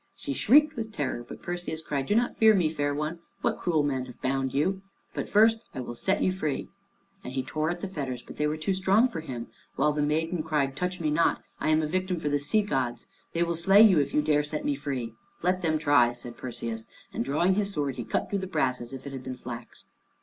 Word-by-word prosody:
She 285 - -4
shrieked 300 +5 +5
with 225 -2 -4
terror, 130 - -2
but - - -11
Perseus 175 -2 -4
cried, 140 -3 -2
"Do 205 - +2
not 240 +2 +2
fear 220 -1 +6
me, 175 -5 +3
fair 145 -2 -1
one. 150 +4 -3 0.2
What - - 0
cruel 160 -4 +1
men 135 -3 -1
have 125 - -12
bound 135 0 0
you? 190 +8 0 0.3
But - - -4
first 225 +2 +5 0.2
I - - -4
will 120 -1 -5
set 190 +11 +1
you 185 - +3
free." 155 -6 -2 0.5
And 125 - -6
he 130 -1 -1
tore 155 +4 -1
at 175 0 -3
the - - -2
fetters, 135 -9 -4
but - - -11
they 150 - +1
were 150 +1 -1
too 160 +5 0
strong 195 +6 +3
for 225 - -5
him, 125 -7 -5 0.3
while 150 +3 +3
the 150 - -1
maiden 160 +3 0
cried, 150 -4 0
"Touch 180 +4 -2
me 155 -3 0
not. 165 +3 +2 0.2
I - - 0
am 155 0 +3
a - - +1
victim 185 +1 -1
for 150 - -1
the 145 0 +1
sea 175 +10 +2
gods. 130 -10 -2 0.3
They 170 - +2
will 170 0 0
slay 195 +5 +6
you 190 -7 +6
if 140 - 0
you 150 - +2
dare 150 -1 +3
to 150 - -5
set 150 0 -3
me 145 - +2
free." 135 -5 -4 0.3
"Let 180 +1 +2
them 160 -2 +1
try," 145 -6 +4
said 120 0 -8
Perseus, 115 -2 -5 0.3
and - - -1
drawing 155 +8 +2
his 200 0 0
sword 145 -7 -2
he 120 - -3
cut 110 - -1
through 200 - -1
the 190 - -4
brass 125 -8 0
as 120 +2 -7
if 135 - -8
it 140 - -6
had 130 -1 -6
been 130 0 -5
flax. 120 -1 -9
150 Hz, 250 wpm, -28 LUFS, 135-185 Hz, 0.5 s, fear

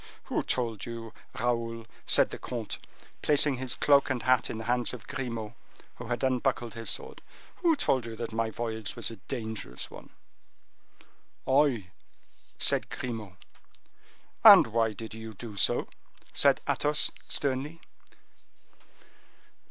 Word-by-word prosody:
"Who - - -1
told 115 -5 -2
you, 115 -1 -7 0.3
Raoul," 115 -1 -1 0.2
said - - +4
the - - -6
comte, 120 -4 -5 0.4
placing 145 -2 +4
his 130 -1 -2
cloak 140 -1 +4
and 130 -3 -1
hat 130 -2 +3
in - - -4
the 110 - -5
hands 120 +1 0
of 120 - -12
Grimaud, 115 -5 -5 0.4
who 120 - -8
had 120 +1 -2
unbuckled 125 -2 0
his 115 -1 -3
sword, - - -4 0.4
"who 335 -2 +3
told 130 - 0
you 115 - -6
that 115 +1 -5
my 115 0 0
voyage 110 -1 -4
was 120 -1 -3
a 115 - -9
dangerous 110 -4 -6
one?" - - -12 1.4
"I," 130 -9 +2 0.7
said - - +1
Grimaud. 110 -7 -5 1.1
"And - - +11
why 115 -1 0
did 110 +1 -8
you 110 -1 -8
do 110 +1 -8
so?" 100 - +3 0.5
said - - +4
Athos, 150 0 +4 0.2
sternly. 140 +4 -1
115 Hz, 135 wpm, -29 LUFS, 110-130 Hz, 1.4 s, And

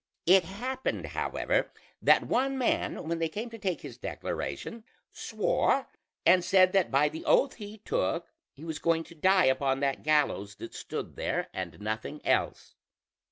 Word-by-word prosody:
It 185 0 +6
happened 250 +8 -3
however - - -1 0.3
that - - +5
one 270 +2 +1
man, 245 -9 -1
when 165 0 -1
they 165 -1 0
came 220 +8 -5
to 225 - -9
take 185 -4 -2
his - - -10
declaration, 230 -1 -5 0.3
swore 275 - +1 0.4
and 180 +1 +6
said 185 0 +4
that 195 -2 +3
by 140 +2 +3
the 160 +2 -6
oath 275 - +4
he 210 -1 -8
took, 485 - -1 0.2
he 145 - -14
was 160 -2 -5
going 165 -1 +1
to 170 - -14
die 185 +3 +4
upon 135 0 +2
that 140 -1 0
gallows 145 -10 +1
that 115 - -9
stood - - -6
there, - - -2
and 85 -4 -5
nothing 110 +7 -4
else. - - 0
170 Hz, 160 wpm, -29 LUFS, 145-210 Hz, 0.4 s, It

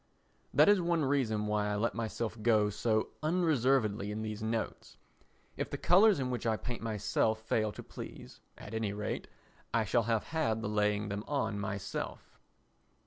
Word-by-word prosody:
That - - +6
is 205 -2 +6
one 170 -3 +1
reason 120 -7 +1
why 105 0 0
I 105 - -1
let 110 +3 0
myself 115 0 -3
go 105 -2 +3
so 110 +1 0
unreservedly 135 - +2
in 110 +1 -3
these 110 0 -4
notes. 110 - -3 0.6
If - - -2
the - - -4
colours 195 0 +5
in 130 -1 -1
which 120 -2 -2
I 110 -1 +2
paint 120 +1 -5
myself 110 0 0
fail 110 -1 0
to - - -9
please, - - -10 0.2
at 105 - -10
any 110 -2 -1
rate 105 0 -3 0.5
I 110 -1 +3
shall 115 +3 +2
have 110 -2 +2
had 115 -9 0
the - - -1
laying 105 0 +1
them 100 +1 -3
on 110 -8 -1
myself. 100 -1 -5
110 Hz, 170 wpm, -32 LUFS, 105-125 Hz, 0.6 s, That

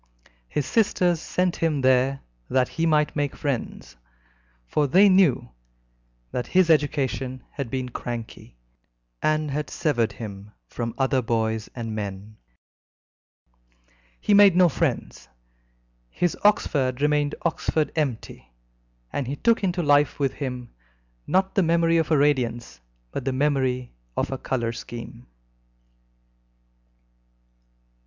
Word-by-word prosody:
His 145 - -1
sisters 175 - +1
sent 180 -1 -1
him 155 -4 0
there 130 +1 +2 0.3
that 130 -1 +2
he 165 0 -1
might 150 -1 +2
make 145 -2 -1
friends, 135 - -4 0.7
for 145 - 0
they 190 +9 +6
knew 185 - +3 0.8
that 125 - -3
his 185 -2 +4
education 135 -4 0
had 140 -4 -5
been 130 0 -3
cranky, 115 - -7 0.6
and 155 -1 +1
had 150 +2 -3
severed 120 -9 0
him 105 -2 -9
from 115 -1 -5
other 135 -1 +1
boys 110 -2 -1
and 115 -3 -4
men. 105 0 -6 1.8
He 210 - +1
made 200 -3 +7
no 180 -1 +6
friends. 95 - -2 0.8
His 175 - -1
Oxford 135 -11 +2
remained 150 0 +1
Oxford 160 -2 0
empty, 125 - -3 0.6
and 140 - -2
he 140 - -3
took 230 +8 +2
into 180 -2 0
life 145 0 +3
with 135 -2 0
him, 125 -4 -6 0.5
not 190 +1 +1
the 195 - +3
memory 165 -1 +3
of 160 -2 +1
a 155 - +4
radiance, 120 - 0 0.3
but - - -4
the 135 0 -1
memory 130 -3 0 0.2
of - - -1
a 135 - -3
colour 120 -3 -2
scheme. 115 - -9
140 Hz, 120 wpm, -24 LUFS, 120-160 Hz, 1.8 s, made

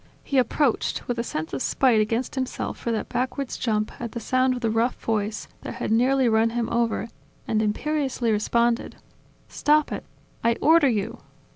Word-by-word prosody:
He 275 - +1
approached, 255 +1 0
with 240 -1 -2
a - - 0
sense 160 -7 -4
of 135 - -2
spite 245 -5 +3
against 225 +4 -1
himself 260 -2 -3
for 235 - -2
that 220 - -2
backwards 255 +2 -2
jump 215 -3 -1
at 235 -2 -5
the 235 - -3
sound 255 +2 +1
of 245 - -6
the 225 -2 +1
rough 230 +3 +1
voice 215 -1 -2
that - - -6
had - - -3
nearly 255 +3 +3
run 225 0 +3
him 235 0 -1
over, 235 -1 0 0.4
and 215 -1 +1
imperiously 260 +2 0
responded: 235 +3 +1 0.5
"Stop 300 0 +2
it! - - -4 0.4
I 235 0 +4
order 320 -3 +5
you!" 210 -4 -2
235 Hz, 175 wpm, -25 LUFS, 220-260 Hz, 0.5 s, order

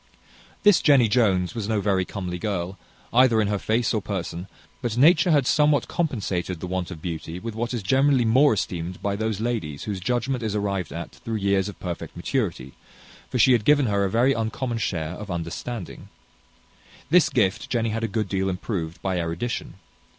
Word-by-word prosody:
This 205 -3 +6
Jenny 140 -6 +5
Jones 100 -6 +2
was 110 -3 -4
no 110 -2 +1
very 95 -2 +1
comely 90 -3 -5
girl, 95 -1 -3 0.3
either 120 -2 +5
in 105 -2 +1
her 105 -1 0
face 110 +2 0
or 110 - 0
person; 90 -2 -4 0.3
but 120 -2 -2
nature 165 +6 +5
had 145 -5 +4
somewhat 150 -1 +3
compensated 95 - -2
the - - -5
want 90 -1 -3
of 85 -4 -9
beauty 80 -1 -5
with 115 +4 -6
what 115 +2 -3
is 120 -5 -3
generally 130 +4 +3
more 130 +3 +5
esteemed 90 -2 -3
by 100 0 0
those 110 -1 -2
ladies 110 -12 -3
whose 100 -3 -3
judgment 125 +5 -1
is 110 -2 -2
arrived 100 -4 -2
at 85 - -7
years 100 -3 +1
of 105 - -11
perfect 85 -3 -6
maturity, 85 - -2 0.6
for 130 - -2
she 130 +2 +5
had 120 -4 +4
given 145 +1 +4
her 100 -3 +1
a 100 - +1
very 120 +6 +3
uncommon 115 +1 -2
share 80 -7 -2
of 105 +3 -8
understanding. 85 +4 -5 1.0
This 175 0 +5
gift 110 -5 0
Jenny 115 -2 0
had 115 +1 -3
a - - +1
good 110 0 -2
deal 95 0 -1
improved 90 -3 -4
by 95 -2 0
erudition. 85 +5 -3
105 Hz, 185 wpm, -24 LUFS, 90-120 Hz, 1.0 s, This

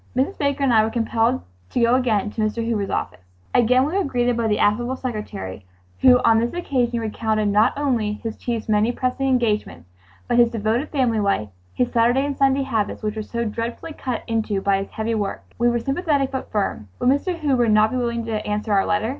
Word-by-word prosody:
Mrs. 270 +10 0
Baker 280 -1 0
and 260 -3 +3
I 220 -1 +5
were 220 - 0
compelled 225 - 0 0.3
to - - -2
go 235 0 +4
again 225 -5 +1
to 220 - -4
Mr. 220 +2 -1
Hoover's 210 -4 -1
office. - - -3 0.3
Again 250 +2 +4
we 305 - -3
were 395 - +2
greeted 245 -4 0
by 230 -1 0
the 210 -1 +1
affable 240 +5 +1
secretary, 210 - -6 0.4
who 255 -1 +7
on 225 -1 +5
this 235 +7 -2
occasion 250 -8 0
recounted 215 -1 -1
not 210 +2 +3
only 240 -8 0
his 220 +1 -6
chief's 235 -3 -4
many 215 +2 +2
pressing 255 +2 -1
engagements, 210 - -1 0.4
but 240 0 +2
his 235 -1 +6
devoted 230 +5 -1
family 250 -6 +1
life—his 105 - -2
Saturday 240 +4 +3
and 285 -1 -2
Sunday 275 0 +2
habits 220 -7 -2
which 210 0 -2
were 215 - -3
"so 235 +2 -3
dreadfully 230 +8 -4
cut 255 -5 -4
into 220 -3 -1
by 195 0 +1
his 195 - -5
heavy 220 +1 -3
work:" 205 -3 -3 0.2
We 240 0 +4
were 240 - +1
sympathetic 275 +2 0
but 265 -1 -5
firm. 200 - -2
Would 250 - +2
Mr. 310 +6 +1
Hoover 270 -7 +1
not 215 0 +4
be 255 - -1
willing 235 -2 -2
to 215 -2 -2
answer 210 +1 -2
our 195 -1 +2
letter? 210 +2 0
230 Hz, 210 wpm, -22 LUFS, 215-255 Hz, 0.4 s, who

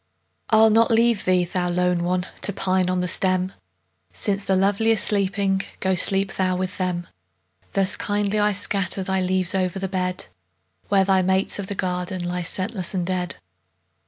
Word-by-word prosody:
I'll 220 0 +5
not 225 +1 +4
leave 230 -2 +2
thee, 185 -1 +3
thou 180 0 -2
lone 180 0 0
one! 180 +1 -1 0.2
To - - +1
pine 185 -1 0
on 185 0 0
the 180 - -1
stem; 185 +1 0 0.6
Since 200 -1 -1
the 190 - +1
lovely 200 +4 +2
are - - +1
sleeping, 200 -2 +2 0.2
Go, 190 0 +1
sleep 195 +2 +2
thou 185 -1 0
with 185 +2 -4
them. 180 -2 -2 0.7
Thus 195 0 +1
kindly 205 0 -1
I 210 0 +3
scatter 195 -1 0
Thy 190 0 -1
leaves 185 0 +1
o'er 185 -1 +1
the 190 +2 -4
bed, 185 -1 -2 0.6
Where 195 -1 +4
thy 190 -1 +3
mates 190 +2 0
of 195 - -4
the 200 - -5
garden 180 0 -3
Lie 180 0 -3
scentless 185 +2 -1
and 180 -2 -1
dead. 180 0 -2
190 Hz, 175 wpm, -23 LUFS, 180-200 Hz, 0.7 s, I'll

